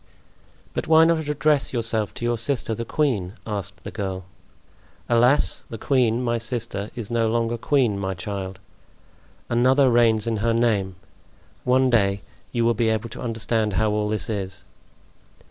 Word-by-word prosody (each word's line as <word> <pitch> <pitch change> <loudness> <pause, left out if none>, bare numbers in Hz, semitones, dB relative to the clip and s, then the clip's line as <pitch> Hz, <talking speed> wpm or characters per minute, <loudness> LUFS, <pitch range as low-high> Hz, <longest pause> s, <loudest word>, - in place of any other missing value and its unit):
"But - - -3
why 160 0 +6
not 165 -2 +1
address 150 -1 +1
yourself 115 -3 -1
to 120 - -4
your 120 -1 0
sister, 120 -2 -1
the 115 +2 -4
queen?" 115 -11 0
asked 100 -3 -5
the - - -6
girl. 95 -3 -4 0.8
"Alas! 120 -3 +3
the 115 - -6
queen, 125 -1 +1
my 120 -1 0
sister, 115 -3 -3
is 120 -2 -6
no 115 -1 +1
longer 115 0 0
queen, 120 -4 +1
my 95 -1 -2
child. 95 +1 -5 0.9
Another 130 +3 +3
reigns 115 -2 +3
in 115 -1 -1
her 115 +2 +1
name. 105 -6 +1 0.7
One 130 +1 +3
day 100 -4 +2 0.3
you 120 -2 0
will 120 - +4
be 115 0 +1
able 110 +1 -1
to - - -9
understand 115 -2 -1
how 110 +2 +1
all 105 0 0
this 105 -6 -1
is." 95 -4 -4
115 Hz, 160 wpm, -23 LUFS, 105-120 Hz, 0.9 s, why